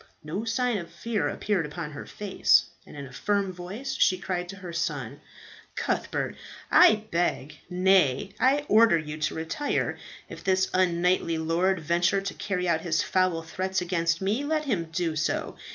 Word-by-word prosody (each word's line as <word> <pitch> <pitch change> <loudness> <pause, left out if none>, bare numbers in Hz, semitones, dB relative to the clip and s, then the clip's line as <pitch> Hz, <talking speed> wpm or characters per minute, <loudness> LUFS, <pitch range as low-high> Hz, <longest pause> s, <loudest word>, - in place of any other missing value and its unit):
No 175 +9 -4
sign 235 -1 0
of 170 - -8
fear 230 -3 -2
appeared 200 -5 -1
upon 150 +1 -6
her 145 - -8
face, 205 -2 +3 0.2
and - - -11
in 140 - -6
a 130 - -12
firm 200 +5 0
voice 200 +10 -6
she 185 -8 +3
cried 180 -1 -3
to 195 - -6
her 180 -3 -8
son, 145 -4 -3 0.5
"Cuthbert, - - -2 0.4
I 280 -13 +6
beg 155 -4 -1
nay, 185 -2 +3
I 280 +3 +3
order 220 -4 +6
you 155 -1 -5
to 155 - -1
retire. 165 - -2 0.3
If - - -10
this 190 -1 +1
unknightly 180 -2 +2
lord 170 +3 +1
venture 175 +5 +2
to 195 0 -4
carry 180 -3 -2
out 165 -2 +1
his 160 -2 0
foul 185 -3 +1
threats 190 +3 -2
against 170 -1 0
me, 215 +8 0
let 305 +1 -1
him 200 -11 0
do 165 -1 -1
so. 155 - -1
180 Hz, 170 wpm, -27 LUFS, 165-200 Hz, 0.5 s, I